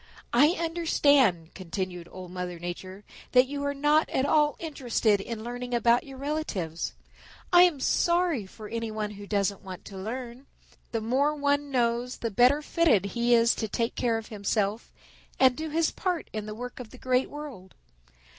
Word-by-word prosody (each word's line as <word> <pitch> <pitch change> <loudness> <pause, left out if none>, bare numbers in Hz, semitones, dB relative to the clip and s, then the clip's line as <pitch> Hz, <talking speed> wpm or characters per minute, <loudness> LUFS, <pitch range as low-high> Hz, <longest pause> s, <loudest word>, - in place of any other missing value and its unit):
"I 290 +7 +5
understand," 285 - +2
continued 180 -1 -5
Old 185 -1 -9
Mother 180 -1 -5
Nature, 185 +3 -7 0.3
"That 250 0 +7
you 285 +1 -5
are 285 - 0
not 295 +2 +3
at 265 - 0
all 295 0 +3
interested 240 -9 0
in 220 +1 -6
learning 245 +1 -4
about 235 +1 +3
your 270 -1 -9
relatives. 260 - -3 0.6
I 350 0 +9
am 335 -6 0
sorry 340 - +1
for 215 +2 -10
any 230 +1 -3
one 215 -1 -3
who 205 0 -10
doesn't 200 -1 0
want 190 -1 -9
to 195 - -9
learn. 240 +5 -6 0.4
The 225 - -1
more 270 +7 +1
one 285 0 0
knows 245 -1 0
the 230 - -3
better 250 +8 +4
fitted 230 - +2
he 240 0 +3
is 230 0 +4
to 220 - -3
take 230 +3 -1
care 235 -2 0
of 225 - -8
himself 210 +1 -1 0.5
and 260 -1 +5
do 315 +3 -4
his 320 +1 +1
part 360 -4 -3
in 215 -1 -4
the 215 - -6
work 245 +3 -7
of 245 -3 -8
the 255 - -13
Great 255 +1 +1
World. 275 -11 -9
240 Hz, 175 wpm, -27 LUFS, 205-285 Hz, 0.6 s, I